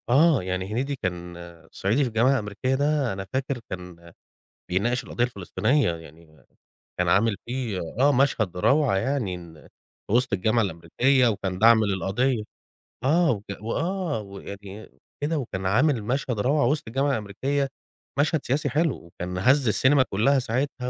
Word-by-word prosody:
آه 145 Hz, -, +4 dB
يعني 95 Hz, +1 st, -3 dB
هنيدي 135 Hz, +5 st, -1 dB
كان 90 Hz, -6 st, -5 dB, 0.4 s
صعيدي 110 Hz, +9 st, 0 dB
في -, -, 0 dB
الجامعة 115 Hz, +4 st, +3 dB
الأمريكية 120 Hz, +2 st, -1 dB
ده، 145 Hz, -4 st, +1 dB
أنا 95 Hz, 0 st, -5 dB
فاكر 130 Hz, 0 st, -1 dB
كان 90 Hz, -2 st, -9 dB, 0.6 s
بيناقش 120 Hz, +8 st, 0 dB
القضية 120 Hz, -, -2 dB
الفلسطينية، 120 Hz, -, 0 dB
يعني 80 Hz, -3 st, -16 dB, 0.5 s
كان 90 Hz, -, +1 dB
عامل 100 Hz, +4 st, +3 dB
فيه 120 Hz, -5 st, -3 dB, 0.2 s
آه 140 Hz, +2 st, +5 dB
مشهد 125 Hz, -9 st, +1 dB
روعة 135 Hz, +2 st, +3 dB
يعني، 95 Hz, -9 st, -2 dB, 0.6 s
وسط 125 Hz, +3 st, +2 dB
الجامعة 110 Hz, +5 st, +2 dB
الأمريكية 110 Hz, +9 st, +2 dB
وكان 95 Hz, -4 st, -2 dB
دعم 110 Hz, 0 st, +6 dB
للقضية، 105 Hz, +5 st, 0 dB, 0.6 s
آه، 160 Hz, +5 st, +3 dB
وك 105 Hz, -4 st, -3 dB, 0.2 s
وآه 165 Hz, -, -2 dB
ويعني 100 Hz, +1 st, -9 dB
إ -, -, -19 dB, 0.3 s
كده 155 Hz, +2 st, 0 dB
وكان 95 Hz, -9 st, -4 dB
عامل 120 Hz, +4 st, +2 dB
مشهد 125 Hz, 0 st, -2 dB
روعة 140 Hz, +6 st, +2 dB
وسط 150 Hz, +3 st, 0 dB
الجامعة 135 Hz, +5 st, 0 dB
الأمريكية، 135 Hz, +5 st, -1 dB, 0.5 s
مشهد 155 Hz, 0 st, +1 dB
سياسي 145 Hz, +3 st, 0 dB
حلو، 150 Hz, +1 st, +1 dB
وكان 90 Hz, +1 st, -6 dB
هز 130 Hz, +7 st, +3 dB
السينما 130 Hz, +6 st, +4 dB
كلها 125 Hz, +8 st, +3 dB
ساعتها 125 Hz, +1 st, -2 dB
120 Hz, 145 wpm, -25 LUFS, 95-140 Hz, 0.6 s, دعم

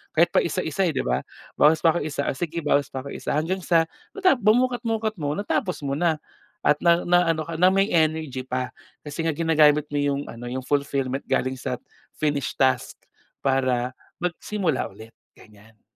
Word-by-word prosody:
kahit -, -, +4 dB
paisa-isa 195 Hz, -2 st, +1 dB
eh -, -, -2 dB
di -, -, 0 dB
ba? 65 Hz, +2 st, 0 dB, 0.4 s
Bawas 155 Hz, +1 st, +5 dB
pa 160 Hz, -, +6 dB
ko 175 Hz, -, 0 dB
1 145 Hz, -2 st, -3 dB
o -, -, 0 dB
sige 170 Hz, 0 st, -3 dB
bawas 145 Hz, -2 st, +2 dB
pa 130 Hz, +1 st, -6 dB
ko -, -, -6 dB
1 -, -, -6 dB
hanggang 170 Hz, +5 st, 0 dB
sa 165 Hz, -2 st, +3 dB, 0.3 s
mata 380 Hz, -4 st, +4 dB
bu 215 Hz, -2 st, +4 dB
mukat-mukat 230 Hz, -3 st, 0 dB
mo 145 Hz, +1 st, -1 dB
natapos 200 Hz, -1 st, -1 dB
mo 135 Hz, -, -1 dB
na 170 Hz, -2 st, +2 dB, 0.5 s
at 150 Hz, -, +5 dB
na 170 Hz, -1 st, +5 dB, 0.3 s
ano 160 Hz, -1 st, 0 dB
ka 165 Hz, 0 st, -5 dB
na 185 Hz, -, +7 dB
may 195 Hz, +2 st, +3 dB
energy 155 Hz, -5 st, +1 dB
pa. 130 Hz, 0 st, -3 dB, 0.3 s
Kasi 150 Hz, +2 st, -4 dB
nga 160 Hz, -, +1 dB
ginagamit 150 Hz, -2 st, +4 dB
mo 145 Hz, -, -1 dB
'yung 140 Hz, -1 st, 0 dB
ano 120 Hz, +1 st, -8 dB
'yung 130 Hz, +1 st, -4 dB
fulfillment 140 Hz, -1 st, -1 dB
galing 130 Hz, 0 st, 0 dB
sa 125 Hz, 0 st, -3 dB, 0.4 s
finished 145 Hz, -3 st, -1 dB
task 130 Hz, -1 st, +1 dB, 0.5 s
para 130 Hz, -2 st, +1 dB, 0.3 s
magsimula 180 Hz, -3 st, -1 dB
ulit, 110 Hz, +3 st, -13 dB, 0.2 s
ganiyan. 110 Hz, +1 st, -19 dB
150 Hz, 180 wpm, -24 LUFS, 130-170 Hz, 0.5 s, na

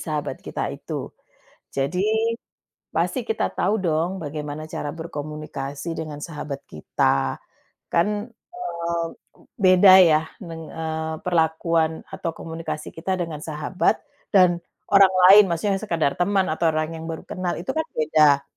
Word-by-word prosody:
sahabat 150 Hz, -2 st, -3 dB
kita -, -, -4 dB
itu. -, -, -6 dB, 0.6 s
Jadi, 140 Hz, +7 st, -1 dB, 0.9 s
pasti -, -, 0 dB
kita 445 Hz, -, -2 dB
tahu 215 Hz, -, +1 dB
dong 175 Hz, +1 st, 0 dB
bagaimana 150 Hz, -1 st, -5 dB
cara 150 Hz, -1 st, -5 dB
berkomunikasi 150 Hz, -1 st, -5 dB
dengan 155 Hz, -2 st, -5 dB
sahabat 150 Hz, -3 st, -6 dB
kita. 65 Hz, -3 st, 0 dB, 0.5 s
Kan, 210 Hz, +6 st, 0 dB, 0.2 s
eee, 170 Hz, -, -3 dB, 0.5 s
beda 185 Hz, -1 st, +7 dB
ya, 155 Hz, -2 st, +5 dB, 0.2 s
neng 165 Hz, -2 st, -8 dB
eee, 160 Hz, 0 st, -3 dB
perlakuan 160 Hz, -1 st, +1 dB
atau 165 Hz, -, -3 dB
komunikasi 160 Hz, -2 st, -5 dB
kita 185 Hz, +3 st, -2 dB
dengan 160 Hz, -3 st, -4 dB
sahabat, 155 Hz, +4 st, 0 dB, 0.4 s
dan 175 Hz, -2 st, +5 dB, 0.3 s
orang 195 Hz, -1 st, +7 dB, 0.2 s
lain, 210 Hz, +1 st, +10 dB
maksudnya 185 Hz, +4 st, 0 dB
yang -, -, -11 dB
sekedar 160 Hz, -6 st, +1 dB
teman, 190 Hz, +1 st, +2 dB
atau 165 Hz, +1 st, +1 dB
orang 155 Hz, +1 st, -1 dB
yang 160 Hz, -, -7 dB
baru 160 Hz, -, -5 dB
kenal, 180 Hz, -1 st, -3 dB
itu 175 Hz, -, -3 dB
kan 320 Hz, 0 st, -1 dB
beda. 150 Hz, -2 st, +4 dB
165 Hz, 135 wpm, -23 LUFS, 155-180 Hz, 0.9 s, lain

